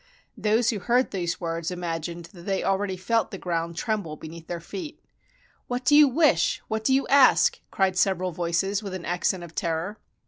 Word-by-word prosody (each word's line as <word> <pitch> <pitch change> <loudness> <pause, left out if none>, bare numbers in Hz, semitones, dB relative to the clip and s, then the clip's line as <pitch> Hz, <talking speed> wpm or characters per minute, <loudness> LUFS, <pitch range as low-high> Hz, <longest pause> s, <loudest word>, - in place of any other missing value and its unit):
Those 225 +2 +2
who 215 - -3
heard 245 +6 +1
these 175 -3 -2
words 165 -1 -3
imagined 170 -1 -4
that 175 0 -13
they 195 -1 0
al 195 - +2
ready 190 -1 -3
felt 225 +5 0
the 195 - -6
ground 170 -2 -3
tremble 205 -7 -2
beneath 160 +1 -10
their 175 -1 -4
feet. 300 - -7 0.7
"What 250 +1 -3
do 290 - +5
you 300 0 +8
wish; 270 - +3
what 220 0 -2
do 240 - +2
you 270 +1 +3
ask?" 280 - +5
cried 190 -1 +1
several 185 -1 +1
voices 175 +4 -1
with 195 -3 -5
an 180 - -7
accent 175 +1 -1
of 170 -1 -10
terror. 170 +4 -2
185 Hz, 195 wpm, -25 LUFS, 170-220 Hz, 0.7 s, you